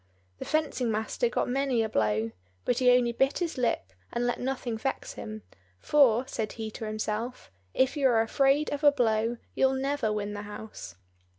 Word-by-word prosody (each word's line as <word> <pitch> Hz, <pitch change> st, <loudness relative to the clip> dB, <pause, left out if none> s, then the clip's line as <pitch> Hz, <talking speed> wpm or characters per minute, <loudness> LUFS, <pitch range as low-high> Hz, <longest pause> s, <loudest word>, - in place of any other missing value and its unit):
The -, -, -5 dB
fencing 305 Hz, -6 st, 0 dB
master 220 Hz, -, 0 dB
got -, -, 0 dB
many 260 Hz, -2 st, +1 dB
a -, -, 0 dB
blow, 110 Hz, -, 0 dB, 0.3 s
but 245 Hz, 0 st, +1 dB
he 250 Hz, -1 st, +5 dB
only 245 Hz, -1 st, +4 dB
bit 270 Hz, +4 st, +1 dB
his 340 Hz, -2 st, -2 dB
lip, 235 Hz, -, -1 dB, 0.2 s
and 240 Hz, +1 st, -1 dB
let 245 Hz, -, 0 dB
nothing 250 Hz, -2 st, -2 dB
vex 265 Hz, +5 st, -3 dB
him; 215 Hz, 0 st, -7 dB, 0.4 s
"for," 260 Hz, -, +4 dB
said 215 Hz, -4 st, -3 dB
he 220 Hz, -1 st, -5 dB
to 220 Hz, -, -6 dB
himself, 215 Hz, -, -4 dB, 0.2 s
"If 260 Hz, +2 st, +2 dB
you 280 Hz, -2 st, +3 dB
are 230 Hz, -3 st, +4 dB
afraid 275 Hz, +5 st, +2 dB
of 290 Hz, +1 st, -3 dB
a 290 Hz, -, +8 dB
blow, 230 Hz, -3 st, +1 dB, 0.2 s
you'll 265 Hz, 0 st, +3 dB
never 270 Hz, -4 st, 0 dB
win 205 Hz, -1 st, -2 dB
the 205 Hz, -, -5 dB
house." 210 Hz, -, -9 dB
240 Hz, 185 wpm, -28 LUFS, 215-270 Hz, 0.4 s, a